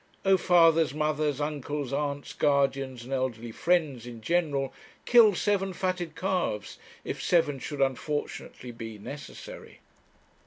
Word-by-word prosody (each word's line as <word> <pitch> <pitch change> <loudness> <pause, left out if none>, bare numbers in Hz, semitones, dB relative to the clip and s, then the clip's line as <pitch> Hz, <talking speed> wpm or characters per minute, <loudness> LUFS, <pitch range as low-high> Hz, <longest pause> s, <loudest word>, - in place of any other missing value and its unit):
Oh, 195 0 +6
fathers, 165 -5 +4
mothers, 150 -2 0
uncles, 145 -2 -3
aunts, 145 0 -2
guardians, 135 -3 +1
and 130 +3 -6
elderly 120 -3 -2
friends 150 -5 0
in 120 -2 -8
general, 145 -1 0 0.3
kill 225 -5 +7
seven 195 -1 0
fatted 180 -3 -2
calves 180 - -2 0.2
if - - -4
seven 150 -6 +2
should 145 +1 -5
unfortunately 135 -2 -2
be 115 -2 -8
necessary! 140 +8 -9
145 Hz, 120 wpm, -28 LUFS, 130-170 Hz, 0.3 s, kill